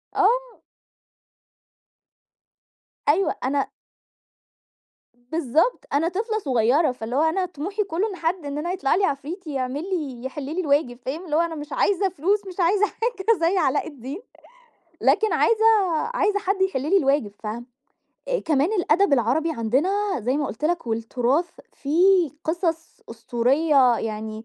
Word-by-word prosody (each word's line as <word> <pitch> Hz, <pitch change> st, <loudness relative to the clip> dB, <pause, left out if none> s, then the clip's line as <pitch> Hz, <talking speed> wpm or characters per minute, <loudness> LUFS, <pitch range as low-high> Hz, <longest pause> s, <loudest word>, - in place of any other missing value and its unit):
آه. 475 Hz, +5 st, +1 dB, 2.5 s
أيوه 360 Hz, +7 st, +2 dB
أنا 275 Hz, +2 st, 0 dB, 1.6 s
بالضبط، 320 Hz, -, +1 dB
أنا 295 Hz, +4 st, +2 dB
طفلة 435 Hz, +4 st, -2 dB
صغيرة، 260 Hz, +3 st, +2 dB
فاللي 245 Hz, -1 st, -6 dB
هو 285 Hz, -, +3 dB
أنا 320 Hz, +4 st, +1 dB
طموحي 365 Hz, +6 st, -3 dB
كله 390 Hz, +2 st, -1 dB
إن 395 Hz, -, -6 dB
حد 340 Hz, -1 st, -2 dB
إن 285 Hz, 0 st, -4 dB
أنا 340 Hz, +4 st, -2 dB
يطلع 315 Hz, -7 st, +1 dB
لي 390 Hz, -, +2 dB
عفريت 315 Hz, +6 st, -4 dB
يعمل 270 Hz, 0 st, -3 dB
لي 285 Hz, -10 st, -4 dB
يحل 270 Hz, +2 st, -5 dB
لي 310 Hz, +7 st, -3 dB
الواجب، 280 Hz, -6 st, 0 dB
فاهم؟ 310 Hz, +8 st, -4 dB
اللي 305 Hz, -3 st, -2 dB
هو 325 Hz, -, +4 dB
أنا 335 Hz, -1 st, -2 dB
مش 295 Hz, 0 st, -7 dB
عايزة 390 Hz, -1 st, +2 dB
فلوس، 375 Hz, +5 st, +1 dB
مش 370 Hz, 0 st, -9 dB
عايزة 390 Hz, +4 st, +3 dB
حاجة 455 Hz, -1 st, -1 dB
زي 335 Hz, +3 st, +2 dB
علاء 290 Hz, -5 st, +1 dB
الدين، 285 Hz, -, -8 dB, 0.8 s
لكن 435 Hz, +1 st, +3 dB
عايزة 445 Hz, -1 st, +3 dB, 0.5 s
عايزة 410 Hz, -4 st, +1 dB
حد 390 Hz, 0 st, -1 dB
يحل 380 Hz, -9 st, +1 dB
لي 330 Hz, +8 st, +3 dB
الواجب، 275 Hz, -, +1 dB
فاهم؟ 225 Hz, +3 st, -5 dB, 0.6 s
آآ -, -, +1 dB
كمان 310 Hz, +4 st, +1 dB
الأدب 355 Hz, -3 st, +2 dB
العربي 270 Hz, +6 st, +2 dB
عندنا 265 Hz, -, 0 dB, 0.3 s
زي 250 Hz, +5 st, 0 dB
ما 295 Hz, -1 st, -1 dB
قُلت 260 Hz, +4 st, -6 dB
لك، 335 Hz, -3 st, 0 dB
والتراث 245 Hz, +8 st, 0 dB, 0.2 s
فيه 345 Hz, +3 st, +3 dB
قصص 330 Hz, 0 st, -2 dB
أسطورية 250 Hz, +3 st, +2 dB
يعني، 220 Hz, 0 st, -5 dB
315 Hz, 145 wpm, -23 LUFS, 265-375 Hz, 2.5 s, هو